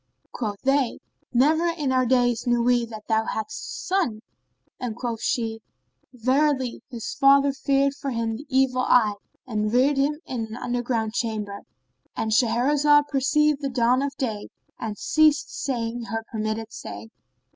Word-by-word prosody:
"[FN#33] - - -46
Quoth 210 -4 -4
they, 270 -2 +2 0.3
"Never 310 +7 +3
in 310 -5 -1
our 255 -1 +2
days 245 -1 +2
knew 240 -1 +2
we 240 -1 +2
that 215 -2 -10
thou 220 -1 +2
hadst 220 - -4
a - - -7
son"; 340 - 0 0.6
and 240 -3 -4
quoth 235 -2 -4
she, 225 -4 -1 0.5
"Verily 260 +1 +1
his 235 -4 -5
father 275 0 +5
feared 275 0 +1
for 280 0 -5
him 230 -2 -2
the 280 +6 -10
evil 260 -1 +2
eye 230 -4 +4 0.3
and 215 -3 -1
reared 265 +4 +3
him 290 +2 +1
in 230 -4 -4
an 220 +2 -8
under 245 0 -2
ground 225 -3 -1
chamber;"—And 205 - -5
Shahrazad 285 +6 +3
perceived 295 +2 +2
the 275 - -1
dawn 250 0 +2
of 280 0 -2
day 220 -6 -3 0.3
and 210 -2 -4
ceased 300 -2 +3
saying 235 -2 -3
her 225 +2 -4
permitted 220 +1 -3
say. 105 +2 -8
245 Hz, 155 wpm, -24 LUFS, 225-275 Hz, 0.6 s, father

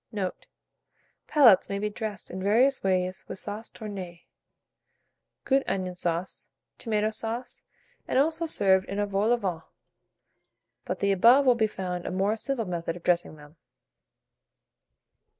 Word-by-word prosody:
Note. 195 -5 -4 0.8
Palates 245 -11 +6
may 200 - -2
be 210 +1 -1
dressed 215 -2 -6
in 185 - -5
various 240 +8 +3
ways 185 -1 0
with - - -6
sauce 210 +3 -6
tournée, 190 -6 -8 1.2
good 270 0 +3
onion 185 -2 -2
sauce, 175 0 -3 0.3
tomato 215 -2 0
sauce, 230 +3 -4 0.5
and - - 0
also 320 +4 +2
served 190 -9 +2
in 200 - -4
a 205 - +1
vol 200 +3 0
au 245 - +4
vent; 180 -7 -3 1.2
but - - -4
the 200 - +2
above 235 +9 +6
will 255 - +6
be 225 -2 +1
found 180 -3 -5
a - - -3
more 195 +3 +1
simple 240 0 -2
method 170 -2 -3
of 175 - -11
dressing 175 -3 +1
them. 150 +1 -16
200 Hz, 145 wpm, -27 LUFS, 185-230 Hz, 1.2 s, Palates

